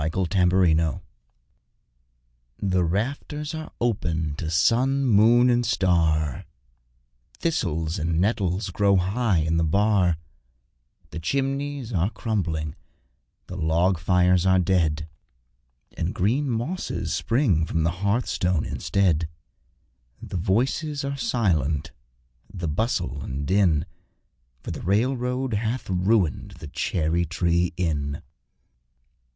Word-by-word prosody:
Cherry 90 -2 +3
Tree 90 -2 +4
Inn 80 -3 +1 1.6
The 95 -2 +1
rafters 140 - -2
are 160 0 -6
open 85 -10 -1
to 80 - -3
sun, 125 +11 +2
moon, 120 +2 +5
and 120 -1 +3
star, 80 - +1 0.9
Thistles 80 - -1
and 80 +1 0
nettles 95 -1 0
grow 100 +1 +3
high 95 +2 +1
in 80 +1 0
the 85 - +2
bar 95 0 +2 0.9
The 80 - -5
chimneys 135 - -2
are 90 +1 +1
crumbling, 85 - -2 0.7
the 90 - -8
log 85 +2 +1
fires 90 +1 +3
are 95 0 +4
dead, 85 -4 +1 0.9
And 85 +3 -3
green 125 +10 +1
mosses 120 - -3
spring 95 - +1
from 80 - 0
the 85 - +1
hearthstone 100 -5 0
instead. 85 -5 0 0.9
The - - -6
voices 130 - 0
are 140 0 -2
silent, 80 - 0 0.6
the 90 -4 -4
bustle 85 - -1
and 70 +2 -4
din, 85 -4 +2 0.8
For - - -5
the - - -6
railroad 125 +5 0
hath 110 +4 -2
ruined 95 - +1
the 75 -3 -9
Cherry 85 +2 0
tree 85 +1 0
Inn. 75 -5 -2
95 Hz, 110 wpm, -24 LUFS, 80-115 Hz, 1.6 s, moon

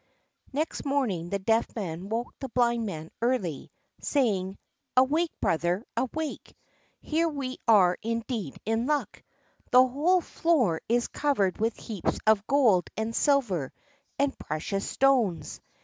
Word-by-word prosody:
Next 305 +4 -2
morning 240 - -1
the 200 - 0
Deaf 225 +4 +1
Man 185 -3 -5
woke 230 +2 -3
the 270 - -5
Blind 235 -2 +1
Man 160 -4 -6
early, 220 - -1 0.3
saying: 200 -9 0 0.4
"Awake, 305 +6 +4
brother, 175 +7 0
awake; 310 +4 -4 0.4
here 330 +2 +1
we 270 -4 -5
are 190 -5 +5
indeed 230 - -3
in 225 +3 0
luck! 295 -1 -1 0.5
The 255 +1 +7
whole 320 +8 +2
floor 260 - +1
is 240 +1 +2
covered 235 -11 0
with 225 +1 0
heaps 210 -6 -3
of 215 -1 +3
gold 235 -11 +3
and 220 +1 -2
silver 225 - +1 0.5
and 280 -1 +1
precious 195 +6 -3
stones." 250 -10 +1
230 Hz, 130 wpm, -27 LUFS, 195-275 Hz, 0.5 s, The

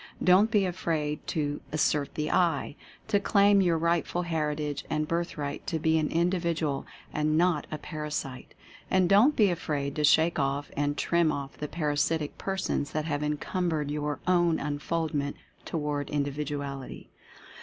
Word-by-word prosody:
Don't 190 +4 +6
be 210 -3 +3
afraid 160 -4 -2
to 145 -2 -2
"assert 150 -1 0
the 150 0 -1
I" 165 -6 +1 0.2
— - - -26
to 210 -2 +3
claim 200 0 +4
your 175 -3 +3
rightful 170 +1 0
heritage 150 -3 -2
and 155 -1 0
birthright 155 -4 -3
to 165 - 0
be 160 0 +2
an 155 - 0
Indi 175 +3 +1
vidual, 160 -5 -1 0.3
and 155 +1 +1
not 170 -3 +2
a 155 - -4
Parasite. 150 -4 -5 0.3
And 185 -1 +3
don't 220 +11 +5
be 205 -4 +4
afraid 145 -4 -2
to 150 - 0
shake 160 +3 +4
off 140 +1 -1
and 145 0 0
trim 170 0 +2
off 140 -2 -5
the 150 - -5
parasitic 150 0 -1
persons 190 -7 -2
that 155 -1 -1
have 145 -2 -1
encumbered 150 0 -1
your 150 -1 -2
own 175 -2 +3
unfoldment 145 0 -2 0.3
toward 150 -3 -2
Individ 145 0 -2
uality. 140 -2 -6
155 Hz, 155 wpm, -28 LUFS, 145-170 Hz, 0.3 s, Don't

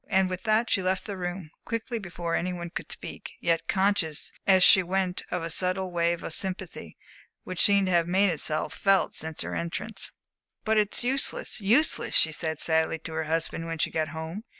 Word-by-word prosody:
And 190 -1 +2
with 185 0 -4
that 220 +2 +2
she 195 - +2
left 185 0 -1
the 205 - -5
room 175 -3 -5
quickly 230 +1 -3
before 175 -3 -5
any 180 +2 0
one 175 -1 -6
could - - -6
speak, - - -7
yet 165 -1 0
conscious 190 -5 0
as 190 -2 +6
she 190 - +8
went 185 0 -1
of 180 -2 -2
a 165 - -3
subtle 185 +1 -1
wave 170 0 0
of - - -4
sympathy, 185 - -5 0.5
which 185 -2 -3
seemed 200 -1 +6
to 185 - -1
have 170 -1 +3
made 190 +2 +3
itself 155 -1 -2
felt 195 -1 +2
since 160 -1 -3
her - - -3
entrance. 170 0 -3 0.5
"But 220 -1 +3
it's 210 +3 +1
useless 265 -3 0
useless," 235 +11 +3
she 160 - +5
said 160 0 -3
sadly 160 +1 +2
to 160 0 -8
her 160 0 -2
husband 165 +1 -2
when 165 0 -4
she - - -1
got 155 -1 -1
home. 160 +6 -6
180 Hz, 195 wpm, -27 LUFS, 165-195 Hz, 0.5 s, she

